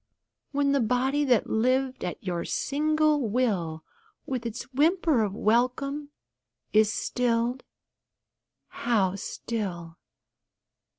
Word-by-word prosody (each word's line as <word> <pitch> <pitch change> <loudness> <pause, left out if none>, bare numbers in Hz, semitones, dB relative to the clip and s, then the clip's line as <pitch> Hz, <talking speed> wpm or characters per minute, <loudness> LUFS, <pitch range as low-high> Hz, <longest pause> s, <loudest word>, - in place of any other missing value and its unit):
When 280 0 +1
the 280 - +3
body 255 +5 +1
that 245 -5 +3
lived 255 +3 +1
at 175 - -5
your 175 -3 -2
single 305 +1 +1
will, 190 -10 0 0.4
With 250 -3 -3
its 230 +1 -5
whimper 315 -2 +3
of 205 -2 -1
welcome, 255 +7 0 0.6
is 215 0 +5
stilled 240 +1 0 1.1
(how 205 -6 0
still!) 180 -6 -5
245 Hz, 100 wpm, -27 LUFS, 215-275 Hz, 1.1 s, is